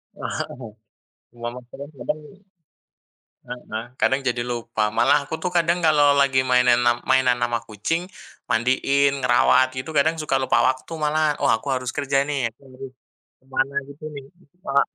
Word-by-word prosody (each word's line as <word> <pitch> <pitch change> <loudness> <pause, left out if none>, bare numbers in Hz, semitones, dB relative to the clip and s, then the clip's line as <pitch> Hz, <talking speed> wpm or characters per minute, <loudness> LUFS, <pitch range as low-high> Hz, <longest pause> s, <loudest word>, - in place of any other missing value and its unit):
Heeh, 120 -4 -6 0.6
cuma 120 0 -6
masalahnya 135 +4 -11
kadang 155 - -3 1.3
heeh 115 -2 -6 0.2
kadang 135 - +3
jadi 120 -2 0
lupa, 115 -3 -2
malah 120 +5 +3
aku 145 - -5
tuh 180 +2 -3
kadang 170 0 +2
kalau 145 -2 +5
lagi 140 -2 +3
mainan 125 -1 +4
am 120 0 +3
mainan 130 -2 +4
ama 120 -1 -1
kucing, 165 - -3 0.4
mandiin, 135 +4 +2
ngerawat 125 +1 +4
gitu 130 +5 -5
kadang 160 +3 +2
suka 150 -3 -1
lupa 130 -3 +2
waktu 130 +5 -2
malah, 150 0 +1
oh 140 - +1
aku 115 +2 +1
harus 125 -1 -3
kerja 140 -1 +1
nih, 140 -5 -1
aku 115 - -47
harus 130 0 -10 0.5
ke - - -36
mana 135 +1 -1
gitu 140 +2 -13
nih, 140 -1 -8
heeh, 180 -1 -30
malah 140 0 +3
130 Hz, 160 wpm, -22 LUFS, 120-145 Hz, 1.3 s, kalau